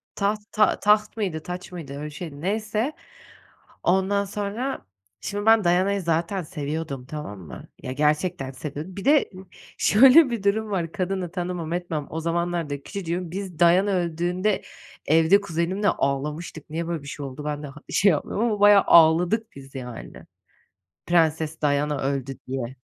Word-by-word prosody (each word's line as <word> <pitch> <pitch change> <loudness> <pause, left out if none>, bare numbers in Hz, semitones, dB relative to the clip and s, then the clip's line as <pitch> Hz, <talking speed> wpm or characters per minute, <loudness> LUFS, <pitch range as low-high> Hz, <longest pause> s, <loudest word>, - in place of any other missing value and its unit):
Taht 205 +1 0
ta 215 -1 +3
taht 210 +1 +3
mıydı, 185 -8 -2
taç 180 +2 -7
mıydı? 165 -6 -7
Öyle 145 +1 -6
bir 150 - -5
şeydi. 150 -2 -8
Neyse, 215 - -1 0.9
ondan 190 +3 +2
sonra, 205 - -4 0.3
şimdi 205 +1 -4
ben 225 -2 +6
Diana'yı 185 +3 +2
zaten 170 +3 0
seviyordum, 150 -4 -5
tamam 135 -9 -7
mı? 85 - -11
Ya, 130 - -4
gerçekten 150 -1 0
seviyordum. 150 +7 -7
Bir 195 - -6
de 295 +1 +4 0.5
şöyle 265 +6 +7
bir 235 -4 -3
durum 215 +2 0
var: 170 -5 -2
Kadını 185 -2 -2
tanımam 175 -3 -4
etmem, 170 -4 -3
o 160 - -4
zamanlar 170 -1 -1
da 140 0 -4
küçücüğüm. 180 -2 -4
Biz 185 -2 -6
Diana 180 +4 +4
öldüğünde 180 +2 0 0.4
evde 165 +6 +5
kuzenimle 185 +2 -1
ağlamıştık. 150 +2 -2
Niye 165 +2 -3
böyle 165 -4 -3
bir 140 - -10
şey 145 0 -6
oldu? 135 +2 -8
Ben 150 0 -3
de - - -5
ha 145 +2 -11
şey 200 - +4
yapmıyorum 190 +7 -1
ama 215 -3 0
bayağı 205 -1 +7
ağladık 175 +7 +5
biz 135 0 -12
yani. 125 -3 -8 0.8
"Prenses 160 -2 +1
Diana 145 0 +1
öldü." 135 -1 -2
diye. 130 -1 -4
170 Hz, 155 wpm, -24 LUFS, 150-200 Hz, 0.9 s, şöyle